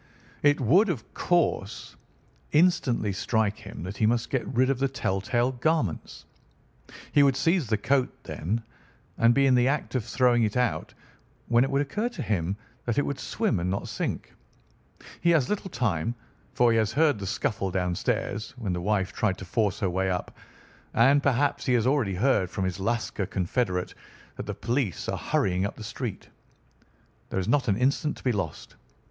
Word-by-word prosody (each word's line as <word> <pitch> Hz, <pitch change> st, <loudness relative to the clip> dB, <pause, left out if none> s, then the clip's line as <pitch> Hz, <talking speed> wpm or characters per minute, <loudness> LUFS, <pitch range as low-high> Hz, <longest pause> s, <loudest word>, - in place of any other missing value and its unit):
It 145 Hz, 0 st, +4 dB
would 175 Hz, -, +4 dB
of 135 Hz, -11 st, -4 dB
course 170 Hz, -, 0 dB, 0.6 s
instantly 140 Hz, -, +3 dB
strike 110 Hz, +1 st, 0 dB
him -, -, -9 dB
that 95 Hz, +3 st, -6 dB
he 110 Hz, -, +3 dB
must 115 Hz, 0 st, 0 dB
get 130 Hz, -, -1 dB
rid 130 Hz, +1 st, +2 dB
of 130 Hz, -, -2 dB
the 135 Hz, -, +2 dB
tell 95 Hz, -8 st, -2 dB
tale 120 Hz, +5 st, +1 dB
garments. 130 Hz, -, -1 dB, 0.9 s
He 145 Hz, -, +5 dB
would 140 Hz, -2 st, +4 dB
seize 165 Hz, +1 st, +1 dB
the 110 Hz, 0 st, +1 dB
coat, 130 Hz, +5 st, +1 dB
then, 105 Hz, +9 st, -3 dB, 0.6 s
and 115 Hz, +1 st, +5 dB
be 140 Hz, -, +4 dB
in 135 Hz, -, +4 dB
the 125 Hz, 0 st, +4 dB
act 145 Hz, +1 st, -1 dB
of 130 Hz, -4 st, 0 dB
throwing 120 Hz, +1 st, +2 dB
it 110 Hz, +1 st, 0 dB
out, 125 Hz, -1 st, 0 dB, 0.6 s
when 120 Hz, +1 st, +5 dB
it 135 Hz, -, -1 dB
would 140 Hz, +1 st, +2 dB
occur 210 Hz, -, -2 dB
to 240 Hz, -, -6 dB
him 95 Hz, -2 st, -1 dB, 0.3 s
that 120 Hz, -2 st, -1 dB
it 145 Hz, -, +3 dB
would 140 Hz, -, -3 dB
swim 210 Hz, -, -1 dB
and 90 Hz, +2 st, -1 dB
not 95 Hz, -, -2 dB
sink. -, -, -4 dB, 0.9 s
He 170 Hz, -, +3 dB
has 160 Hz, -7 st, +3 dB
little 205 Hz, -2 st, -2 dB
time, 115 Hz, -, -1 dB, 0.4 s
for 120 Hz, -1 st, +4 dB
he 115 Hz, -, +3 dB
has 110 Hz, -1 st, +1 dB
heard 150 Hz, -4 st, +3 dB
the 100 Hz, -, -5 dB
scuffle 100 Hz, -2 st, -1 dB
downstairs 95 Hz, +4 st, -2 dB
when 105 Hz, -7 st, -2 dB
the 90 Hz, -, -2 dB
wife 95 Hz, 0 st, 0 dB
tried 100 Hz, -4 st, 0 dB
to 95 Hz, -, -8 dB
force 100 Hz, +2 st, 0 dB
her 95 Hz, -, +1 dB
way 95 Hz, +1 st, 0 dB
up, 90 Hz, -1 st, -3 dB, 0.6 s
and 135 Hz, +5 st, +5 dB
perhaps 140 Hz, +1 st, +1 dB
he 125 Hz, -, +3 dB
has 120 Hz, -2 st, +2 dB
already 130 Hz, -8 st, +1 dB
heard 100 Hz, -3 st, +2 dB
from 95 Hz, +1 st, -2 dB
his 95 Hz, +1 st, -3 dB
Lascar 110 Hz, -1 st, -1 dB
confederate 90 Hz, -1 st, -1 dB, 0.4 s
that -, -, -7 dB
the -, -, -3 dB
police 120 Hz, -, -2 dB
are -, -, -2 dB
hurrying 90 Hz, -1 st, 0 dB
up 100 Hz, -, -3 dB
the 110 Hz, -, -9 dB
street. 115 Hz, -1 st, -5 dB, 1.0 s
There -, -, -1 dB
is 95 Hz, -, -2 dB
not 135 Hz, +3 st, +2 dB
an 100 Hz, -2 st, +2 dB
instant 140 Hz, +4 st, +1 dB
to -, -, -14 dB
be 125 Hz, -, +2 dB
lost. 95 Hz, -9 st, -4 dB
115 Hz, 190 wpm, -27 LUFS, 100-135 Hz, 1.0 s, He